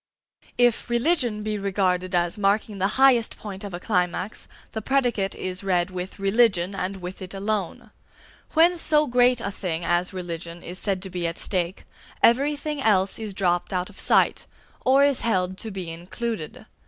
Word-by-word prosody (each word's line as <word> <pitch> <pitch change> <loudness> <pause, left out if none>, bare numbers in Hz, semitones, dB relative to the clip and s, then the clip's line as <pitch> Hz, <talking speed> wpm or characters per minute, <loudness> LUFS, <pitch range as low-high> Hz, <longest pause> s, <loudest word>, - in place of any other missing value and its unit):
If 245 -1 +2
"religion" 240 -4 +1
be 215 -1 -2
regarded 185 -2 0
as 175 -1 +1
marking 205 0 0
the 190 - +2
highest 260 -4 +4
point 200 -2 -8
of 200 - -6
a 175 - -5
climax, 180 +1 -1 0.2
the 220 - -4
predicate 245 -6 0
is 185 +1 -3
read 180 -2 +1
with 185 +1 -6
"religion," 195 -2 +2
and 195 0 -3
with 180 +1 -7
it 185 +1 -7
alone. 200 -2 -3 0.6
When 340 +3 +5
so 305 -2 +3
great 245 -1 +3
a 200 - -3
thing 175 -4 -3
as 175 +1 +1
religion 170 -2 -6
is 180 +2 -6
said 195 -3 -1
to 190 - -7
be 175 -1 -2
at 165 - -4
stake, 180 -1 -1 0.4
everything 290 +4 +2
else 200 -4 +2
is 215 -3 -6
dropped 175 -3 0
out 185 +1 -2
of 200 - -13
sight, - - +2 0.4
or 270 +2 +5
is 285 -3 +2
held 185 -5 0
to 225 - -3
be 185 -5 -5
included. 180 +2 -5
195 Hz, 170 wpm, -24 LUFS, 180-235 Hz, 0.6 s, When